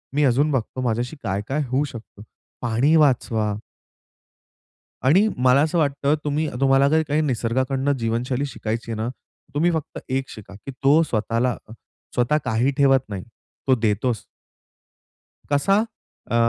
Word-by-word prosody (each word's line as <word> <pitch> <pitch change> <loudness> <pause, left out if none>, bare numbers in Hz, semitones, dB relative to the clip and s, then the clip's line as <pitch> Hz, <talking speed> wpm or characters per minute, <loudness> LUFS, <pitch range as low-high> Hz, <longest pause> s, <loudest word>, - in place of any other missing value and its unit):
मी 150 - +3
अजून 140 +4 +3
बघतो 130 -1 -2
माझ्याशी 120 +3 -1
काय, 100 -2 -1
काय 150 +3 -1
होऊ 135 +3 +2
शकतं. 115 -5 -11 0.4
पाणी 120 +7 +2
वाचवा 115 -7 +2 1.5
आणि 185 +11 +5
मला 130 +2 +4
असं 160 +3 +1
वाटतं 140 -1 +1
तुम्ही 150 +1 0
तुम्हाला 135 +1 +4
जर 160 +2 +3
काही 150 +2 +1
निसर्गाकडनं 130 +1 0
जीवनशैली 120 +4 -1
शिकायची 115 -3 -4
आहे 115 - -2
ना, 110 - -1 0.5
तुम्ही 165 +4 +2
फक्त 160 -3 -4
एक 135 +1 -1
शिका, 100 -2 -11
की 120 +7 -9
तो 145 +4 +6
स्वतःला, 115 -1 0 0.6
स्वतः 125 +5 +2
काही 115 +5 +1
ठेवत 135 -2 +4
नाही. 95 -2 -5 0.4
तो 130 - +5
देतोच. 110 0 0 1.3
कसा? 145 +8 +3 0.5
अ, 115 - +1
130 Hz, 140 wpm, -23 LUFS, 115-145 Hz, 1.5 s, तो